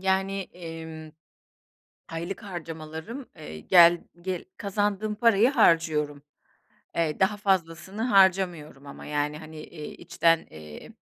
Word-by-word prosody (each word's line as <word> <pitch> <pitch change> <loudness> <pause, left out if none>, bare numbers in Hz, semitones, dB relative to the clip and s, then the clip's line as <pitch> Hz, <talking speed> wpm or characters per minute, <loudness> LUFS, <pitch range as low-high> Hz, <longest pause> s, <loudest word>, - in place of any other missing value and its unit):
Yani, 190 +1 0
emm, 160 -2 -8 1.0
aylık 170 +6 -5
harcamalarım, 165 - -7
eee, 75 +1 -9
gel 170 - +6 0.2
ge 185 0 -4
kazandığım 205 +1 -1
parayı 225 +1 +4
harcıyorum. 155 - +2 0.7
Eee, 160 -3 0
daha 190 +2 +3
fazlasını 190 0 -1
harcamıyorum. 185 - +2
Ama, 140 - -10
yani, 150 0 -1
hani, 155 0 -11
eee, 155 0 -8
içten, 165 0 +1
eee, 75 -1 -11
170 Hz, 110 wpm, -26 LUFS, 155-195 Hz, 1.0 s, gel